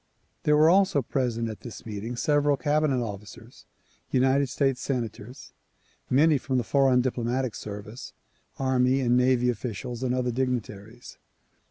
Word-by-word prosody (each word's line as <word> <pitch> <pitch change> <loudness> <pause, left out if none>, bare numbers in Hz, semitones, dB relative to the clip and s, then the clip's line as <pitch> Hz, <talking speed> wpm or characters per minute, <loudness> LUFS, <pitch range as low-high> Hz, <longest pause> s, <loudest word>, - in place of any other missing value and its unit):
There 150 0 +4
were 155 +1 +6
also 190 -7 +3
present 115 -2 -1
at 110 -2 -7
this 120 - -10
meeting 110 +2 -5
several 145 +2 +2
cabinet 145 -2 +1
officers, 105 -1 -10 0.4
United 135 +2 +2
States 135 -2 0
senators, 120 -2 -5 0.6
many 150 +2 +4
from 130 0 -2
the 125 - +1
foreign 135 0 +3
diplomatic 125 -1 -2
service, 105 +3 -8 0.5
army 130 0 +2
and 120 -1 +2
navy 125 0 +3
officials 120 +1 -6
and 125 -1 0
other 125 -1 -1
dignitaries. 120 -3 -4
125 Hz, 135 wpm, -26 LUFS, 115-135 Hz, 0.6 s, were